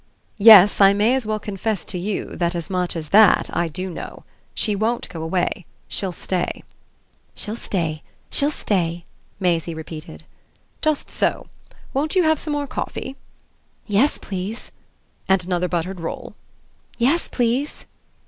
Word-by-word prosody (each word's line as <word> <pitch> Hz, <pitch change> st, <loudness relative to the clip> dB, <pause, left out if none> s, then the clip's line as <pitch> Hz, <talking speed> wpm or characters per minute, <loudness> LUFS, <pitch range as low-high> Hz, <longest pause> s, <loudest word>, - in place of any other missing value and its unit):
"Yes, 205 Hz, -2 st, +9 dB
I 195 Hz, 0 st, +8 dB
may 210 Hz, +5 st, +3 dB
as 260 Hz, -4 st, -1 dB
well 215 Hz, 0 st, 0 dB
confess 210 Hz, 0 st, -3 dB
to -, -, -4 dB
you 200 Hz, +3 st, -3 dB
that 175 Hz, 0 st, 0 dB
as 170 Hz, +3 st, -4 dB
much 180 Hz, -1 st, -1 dB
as 155 Hz, -2 st, -5 dB
that 215 Hz, -1 st, +5 dB
I 170 Hz, -, +1 dB
do 185 Hz, +4 st, -5 dB
know. 175 Hz, -, -8 dB, 0.3 s
SHE 210 Hz, -3 st, 0 dB
won't 230 Hz, +3 st, -1 dB
go 165 Hz, -, -7 dB
away. 175 Hz, +1 st, -1 dB, 0.2 s
She'll 190 Hz, -2 st, -1 dB
stay." 180 Hz, +1 st, -3 dB, 0.7 s
"She'll 215 Hz, +1 st, -3 dB
stay. 165 Hz, -9 st, -2 dB, 0.3 s
She'll 285 Hz, -, +3 dB
stay," 175 Hz, -, -1 dB, 0.3 s
Maisie 170 Hz, -3 st, 0 dB
repeated. 160 Hz, +1 st, -9 dB, 0.6 s
"Just 310 Hz, -2 st, 0 dB
so. -, -, -1 dB, 0.4 s
Won't 300 Hz, +6 st, -1 dB
you 370 Hz, -, +5 dB
have 315 Hz, -2 st, +3 dB
some 300 Hz, -, -3 dB
more 290 Hz, 0 st, -1 dB
coffee?" 270 Hz, 0 st, -5 dB, 0.7 s
"Yes, 215 Hz, +8 st, +2 dB
please." 195 Hz, +4 st, -6 dB, 0.6 s
"And 190 Hz, -2 st, +3 dB
another 180 Hz, 0 st, 0 dB
buttered 180 Hz, +2 st, -2 dB
roll?" 165 Hz, -, -6 dB, 0.6 s
"Yes, 275 Hz, +8 st, +2 dB
please." 250 Hz, +4 st, -1 dB
195 Hz, 145 wpm, -22 LUFS, 175-230 Hz, 0.7 s, Yes